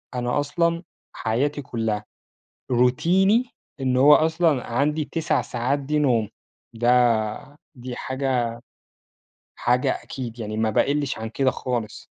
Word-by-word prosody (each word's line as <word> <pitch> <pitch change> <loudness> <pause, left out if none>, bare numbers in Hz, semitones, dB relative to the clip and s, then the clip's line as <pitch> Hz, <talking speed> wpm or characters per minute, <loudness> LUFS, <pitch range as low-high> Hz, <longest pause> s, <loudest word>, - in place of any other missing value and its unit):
أنا 125 +3 0
أصلًا 170 +4 0 0.3
حياتي 140 +6 -1
كلّها 110 -5 -3 0.7
روتيني 180 - +3 0.3
إن 130 -1 0
هو 145 +3 +8
أصلًا 160 -4 +2
عندي 150 +4 +1
9 165 -2 0
ساعات 125 +4 -1
دي 150 +2 -1
نوم، 120 -7 +2 0.4
ده 120 +2 +1 0.2
دي 125 -1 -7
حاجة 130 -2 -1 1.1
حاجة 125 +1 +1
أكيد 120 -3 -7
يعني 110 -1 -5
ما 110 0 +1
باقِلِّش 140 +4 0
عن 110 0 -4
كده 130 +3 +1
خالص. 120 -4 -4
130 Hz, 120 wpm, -23 LUFS, 120-145 Hz, 1.1 s, هو